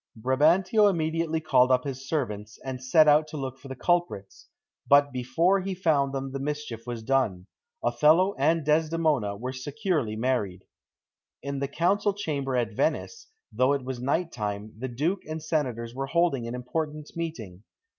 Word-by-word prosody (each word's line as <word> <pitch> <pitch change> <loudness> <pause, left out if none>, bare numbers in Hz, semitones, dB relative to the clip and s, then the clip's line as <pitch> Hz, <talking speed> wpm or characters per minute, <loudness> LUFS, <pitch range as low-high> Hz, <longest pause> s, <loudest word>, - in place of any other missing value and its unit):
Brabantio 170 - +4
immediately 165 -2 -1
called 130 -5 +3
up 125 0 +3
his 135 -1 -6
servants, 110 -8 -3
and 130 -1 -5
set 155 +4 +5
out 150 +1 +5
to 155 0 -7
look 135 -1 -5
for 140 - -12
the 130 - -6
culprits; 175 - -1 0.4
but 145 0 +5
before 130 +10 +1
he 190 0 -3
found 150 -7 +1
them 135 0 -4
the 135 - -4
mischief 140 -5 -5
was 120 -2 -5
done 110 -8 0 0.4
Othello 170 +6 +4
and 160 +2 +2
Desdemona 155 -8 +1
were 125 +4 -5
securely 145 - -2
married. 110 -6 -1 0.8
In 140 0 -3
the 140 - -1
Council 195 +8 +1
Chamber 140 -9 -2
at 115 -3 0
Venice, 165 - -2 0.3
though 130 +2 +3
it 140 -3 -2
was 130 -2 -5
night 160 +6 0
time, 105 -1 -4
the 125 +4 -5
Duke 155 +10 -1
and 155 +1 -4
senators 130 -7 -2
were 135 +2 -4
holding 160 -6 +1
an 120 - -4
important 150 +4 -4
meeting. 120 - -6
140 Hz, 165 wpm, -27 LUFS, 125-160 Hz, 0.8 s, set